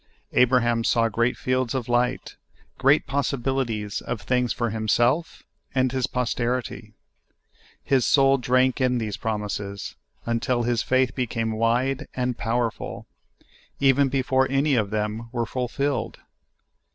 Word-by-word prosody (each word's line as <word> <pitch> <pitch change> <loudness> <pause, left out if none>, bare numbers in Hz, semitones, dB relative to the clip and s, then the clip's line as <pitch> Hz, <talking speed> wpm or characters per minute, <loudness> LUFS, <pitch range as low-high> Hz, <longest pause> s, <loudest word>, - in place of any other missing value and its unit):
Abraham 120 -2 +3
saw 115 0 +2
great 115 +3 0
fields 130 -1 -1
of 125 -3 -2
light 125 +1 0 0.2
— - - -34
great 140 +3 +4
possibilities 130 -6 -2
of 115 - -4
things 125 +3 0
for 120 -2 -1
himself 120 +8 0 0.3
and 130 -1 +2
his 130 -2 0
posterity. 125 0 -2 0.9
His 135 -3 +2
soul 135 +1 +4
drank 130 +1 +2
in 125 -1 +2
these 110 -3 -3
promises, 105 -2 -4 0.3
until 120 +1 0
his 120 -1 +1
faith 130 -1 +1
became 115 -3 -2
wide 125 +5 0
and 125 -1 -1
powerful, 115 0 -2 0.7
even 135 0 +4
before 130 0 +1
any 140 +2 +2
of 110 -5 +1
them 110 +2 -3
were 120 -2 -1
fulfilled. 130 +4 -2
125 Hz, 125 wpm, -24 LUFS, 115-130 Hz, 0.9 s, great